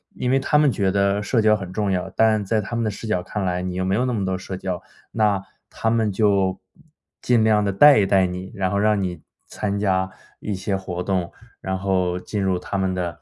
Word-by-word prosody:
因 125 0 -1
为 135 - +3
他 150 +2 +2
们 150 -2 +4
觉 95 -4 0
得 100 +1 +1
社 110 +2 +1
交 110 0 +4
很 95 -3 -6
重 105 -2 -1
要， 90 0 -1
但 110 -1 +2
在 110 +3 +1
他 120 - -5
们 115 - 0
的 - - +1
视 105 +2 -7
角 110 -4 0
看 100 +2 -4
来， 90 0 -1
你 90 0 -4
又 95 - -1
没 95 - 0
有 125 +4 +1
那 125 - -1
么 100 -4 -1
多 95 0 -1
社 95 0 -6
交， 90 -2 -4 0.3
那 105 -3 +1 0.3
他 110 - -2
们 110 -3 +1
就 95 -2 +1 0.6
尽 120 -3 +3
量 105 -1 +3
地 100 - 0
带 140 +5 +7
一 100 - +3
带 95 -1 +4
你， 90 +1 -5
然 95 -2 -1
后 100 - 0
让 105 -1 +2
你 90 -4 -4 0.2
参 100 -1 -3
加 95 -2 +1 0.3
一 105 -2 -3
些 95 +1 -2
活 90 -2 -4
动， 90 -2 -1 0.3
然 95 0 -2
后 90 -2 0
进 100 +2 -4
入 95 -1 +1
他 95 +2 -4
们 95 -1 0
的， 85 -3 -4
100 Hz, 260 characters per minute, -22 LUFS, 95-105 Hz, 0.6 s, 带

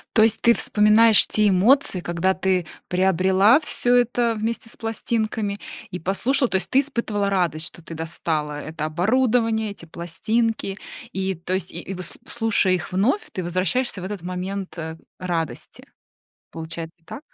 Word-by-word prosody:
То 220 - +6
есть 220 0 +3
ты 235 - +6
вспоминаешь 215 +1 +6
те 210 -1 +2
эмоции, 200 +2 +3
когда 175 +2 0
ты 185 -2 0 0.2
приобрела 190 - +4
всё 245 -4 +1
это 240 -1 +2
вместе 230 +1 -3
с - - -10
пластинками 220 -2 -2 0.3
и 180 - -6
послушала, 240 - +1
то - - -2
есть 190 - -3
ты 270 - +4
испытывала 220 -7 -2
радость, 165 -4 0
что 170 - -11
ты 165 - -9
достала 155 -2 -2
это 155 0 -5
оборудование, 220 +5 +1
эти 185 -4 -11
пластинки, 205 +5 -2 0.4
и, 190 0 -1
то 175 +2 -5
есть 190 - -3
и - - -5
и 195 - -6
выс 180 -1 -5
слушая 225 -5 +1
их 175 -2 -3
вновь, 250 - +1
ты 185 - -4
возвращаешься 185 +5 -1
в - - -8
этот 200 -2 -5
момент, 185 +2 -5
э, 160 0 -6 0.2
радости. 165 -8 -4 0.7
Получается, 165 0 -7
так? 275 - -8
190 Hz, 160 wpm, -22 LUFS, 175-225 Hz, 0.7 s, То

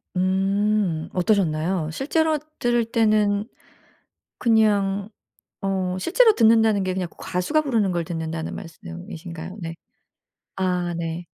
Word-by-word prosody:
음. 190 -2 +1
어떠셨나요? 175 -3 +1
실제로 315 - +1 0.2
들을 240 -1 +2
때는 215 -2 +2 0.9
그냥 205 -3 +2 0.5
어 190 -2 -1
실제로 450 - +4
듣는다는 225 - +4
게 185 -1 -1
그냥 185 -2 -2
그 - - -24
가수가 180 - 0
부르는 225 -10 +1
걸 170 -1 -1
듣는다는 160 -1 -4
말씀이신가요? 165 - -8
네. 165 -1 -5 0.8
아 180 -2 0
네. 165 +1 -4
190 Hz, 245 characters per minute, -23 LUFS, 170-215 Hz, 0.9 s, 실제로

